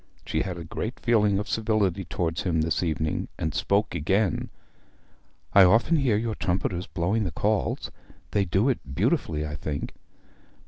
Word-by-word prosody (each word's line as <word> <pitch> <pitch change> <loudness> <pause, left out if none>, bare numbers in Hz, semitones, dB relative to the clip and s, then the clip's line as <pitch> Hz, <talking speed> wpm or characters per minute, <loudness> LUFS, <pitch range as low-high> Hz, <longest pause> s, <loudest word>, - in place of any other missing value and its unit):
She 80 - -1
had 90 -1 -3
a 85 - -6
great 110 +8 -5
feeling 105 -4 +3
of 105 - -3
civility 105 -4 0
toward 80 -1 -2
him 80 -4 0
this 80 -1 0
evening, 80 -2 -1
and 80 -1 -2
spoke 100 +8 +1
again. 95 +5 0 1.0
'I 100 -1 +9
often 115 - +4
hear 130 -8 +2
your 115 0 -1
trumpeters 90 -1 -1
blowing 95 +6 0
the 95 - -1
calls. 105 +3 -1 0.4
They 100 - +2
do 95 +7 +2
it 130 - +1 0.2
beautifully, 75 +1 0
I 75 - -5
think.' 75 0 -4
95 Hz, 155 wpm, -26 LUFS, 80-105 Hz, 1.0 s, I